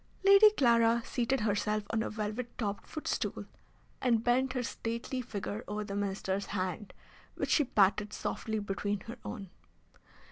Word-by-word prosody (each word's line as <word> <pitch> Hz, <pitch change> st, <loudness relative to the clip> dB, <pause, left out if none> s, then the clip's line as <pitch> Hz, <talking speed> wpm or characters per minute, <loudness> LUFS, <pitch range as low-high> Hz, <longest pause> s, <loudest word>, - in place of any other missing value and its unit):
Lady 395 Hz, +2 st, +9 dB
Clara 235 Hz, -2 st, +4 dB
seated 250 Hz, +2 st, 0 dB
herself 210 Hz, 0 st, 0 dB
on 225 Hz, -, +1 dB
a -, -, -2 dB
velvet 215 Hz, +3 st, -4 dB
topped 205 Hz, -3 st, -3 dB
footstool, 310 Hz, -, -3 dB, 0.6 s
and 230 Hz, -3 st, +2 dB
bent 255 Hz, +2 st, +2 dB
her 250 Hz, -2 st, -1 dB
stately 235 Hz, +3 st, -3 dB
figure 210 Hz, -2 st, -5 dB
over 210 Hz, +1 st, -3 dB
the 200 Hz, -1 st, -5 dB
Minister's 195 Hz, -1 st, -2 dB
hand, 190 Hz, +1 st, -3 dB, 0.4 s
which -, -, -2 dB
she 295 Hz, -, +4 dB
patted 210 Hz, -2 st, +3 dB
softly 220 Hz, +1 st, -3 dB
between 205 Hz, 0 st, -2 dB
her 230 Hz, -, -9 dB
own. 195 Hz, -3 st, -7 dB
220 Hz, 145 wpm, -31 LUFS, 205-240 Hz, 0.6 s, Lady